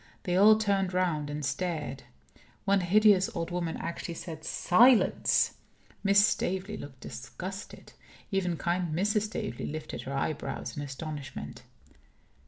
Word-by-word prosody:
They 180 -2 -1
all 210 +3 +7
turned 195 -3 0
round 160 -5 0
and 145 0 -3
stared. 155 -2 -3 0.6
One 200 0 +4
hideous 195 +1 +4
old 170 +1 -3
woman 175 -2 -2
actually 170 0 -5
said, 160 -2 -7
"Silence!" 235 +10 +4 0.5
Miss 200 0 +6
Staveley 190 0 -1
looked 135 - -10
disgusted. 135 - -8 0.4
Even 180 -4 0
kind 175 0 -1
Mrs. 210 +4 +2
Staveley 165 - -4
lifted 155 +1 -5
her 135 - -6
eyebrows 140 +2 -3
in 145 - -4
astonishment. 140 - -6
175 Hz, 125 wpm, -29 LUFS, 150-195 Hz, 0.6 s, all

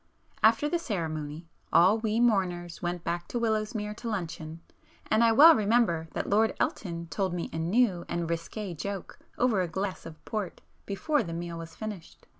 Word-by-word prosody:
After 225 +6 +5
the 345 +3 0
ceremony 160 - -4 0.3
all 190 +6 +5
we 220 0 0
"mourners" 180 -7 +1
went 175 -1 -3
back 175 +1 -3
to 240 - -2
Willowsmere 215 -1 -1
to 235 - -5
luncheon, 165 -5 -4 0.5
and 220 +2 +5
I 230 - +5
well 305 +9 +9
remember 210 - +2
that - - -2
Lord 220 +2 +3
Elton 170 -4 -2
told 190 -2 -1
me 170 - -4
a 160 - -3
new 180 +1 +2
and 170 -1 -2
risqué 170 +3 -4
joke 200 +3 -6 0.2
over 235 -6 +2
a 180 - 0
glass 190 +2 -4
of 155 -1 -13
port 210 -5 -4 0.3
before 295 +9 +1
the 165 - -5
meal 170 0 -5
was 165 0 -9
finished. 210 -6 -8
190 Hz, 175 wpm, -28 LUFS, 170-220 Hz, 0.5 s, well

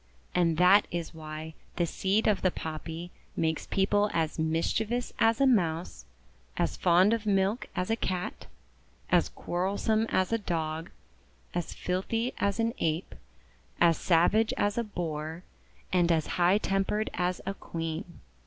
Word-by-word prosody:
And 170 -3 +2
that 185 +4 +6
is 170 -1 -4
why 155 0 -7 0.2
the 175 - +1
seed 195 +5 0
of 210 -2 +2
the 185 - +3
Poppy 165 +1 -6 0.2
makes 160 -1 -1
people 205 +2 +2
as 160 -1 0
mischievous 205 +9 0
as 225 +2 +4
a 275 - +5
Mouse, 165 - +1 0.5
as 80 -3 0
fond 180 - +4
of 225 -2 -2
milk 200 +3 +1
as 185 +3 -1
a - - +3
Cat, 185 -5 -3 0.6
as - - +4
quarrelsome 205 +5 -1
as 185 +4 +1
a 230 - +2
Dog, 160 -3 -3 0.6
as 175 -2 -3
filthy 225 +7 -1
as 200 +2 0
an 230 0 +1
Ape, 160 +1 -1 0.7
as 170 -1 +5
savage 195 +6 +3
as 205 +1 +1
a 235 - 0
Boar, 165 -4 -4 0.5
and 175 -2 +4
as 160 -2 +2 0.2
high 180 +3 +5
tempered 210 +1 0
as 180 0 -1
a 195 - -2
Queen. 165 0 -6
180 Hz, 145 wpm, -29 LUFS, 165-205 Hz, 0.7 s, that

